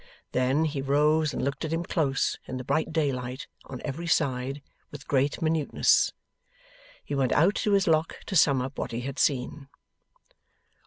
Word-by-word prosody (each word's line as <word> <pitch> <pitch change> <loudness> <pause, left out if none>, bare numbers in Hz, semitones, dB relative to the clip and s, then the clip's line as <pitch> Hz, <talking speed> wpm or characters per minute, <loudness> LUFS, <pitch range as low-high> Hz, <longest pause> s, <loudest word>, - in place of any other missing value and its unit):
Then, 130 +5 +2
he 145 -3 -2
rose 150 +3 +2
and - - -3
looked 140 0 -3
at 160 - -3
him 165 +1 -1
close, 145 -6 0
in 130 - -4
the 130 - -5
bright 155 +5 0
daylight, 130 -5 -2 0.2
on 130 - -8
every 155 +4 -4
side, 135 -2 0 0.3
with 145 -1 -11
great 140 +3 +1
minuteness. 155 -2 +2 0.9
He - - -5
went 135 -3 +1
out 175 +7 +4
to 210 - +1
his 195 -1 +3
Lock 160 0 +2
to 190 - -4
sum 140 -6 +4
up 135 +1 -6
what - - -4
he 115 - -2
had 135 +2 -5
seen. 135 +1 0
145 Hz, 170 wpm, -27 LUFS, 130-160 Hz, 0.9 s, out